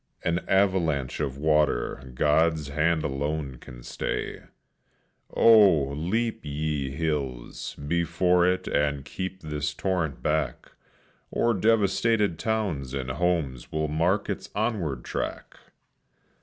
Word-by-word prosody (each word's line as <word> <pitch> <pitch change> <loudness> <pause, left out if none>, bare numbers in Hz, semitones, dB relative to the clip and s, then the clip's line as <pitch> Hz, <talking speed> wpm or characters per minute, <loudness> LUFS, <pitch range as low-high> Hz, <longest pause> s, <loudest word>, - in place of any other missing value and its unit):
An 85 +1 +1
avalanche 90 -9 +1
of 70 0 -2
water 75 -4 +1
God's 75 +1 +2
hand 80 +2 +1
alone 70 -1 -2
can - - -12
stay! - - -4 0.9
Oh, 100 -11 +6
leap, 100 +11 -1
ye 75 -2 -2
hills, 70 -5 -3
before 85 +4 +1
it 90 0 0
and 70 -1 0
keep 95 +4 -5
this 75 0 -3
torrent 90 -6 -2
back, 75 0 -1 0.6
Or 120 0 +1
devastated 105 -2 +2
towns 90 - -1
and 65 -1 -3
homes 75 -5 -1
will 80 -1 -1
mark 85 +7 +1
its - - -4
onward 80 - -1
track! - - -5
80 Hz, 110 wpm, -26 LUFS, 70-95 Hz, 0.9 s, Oh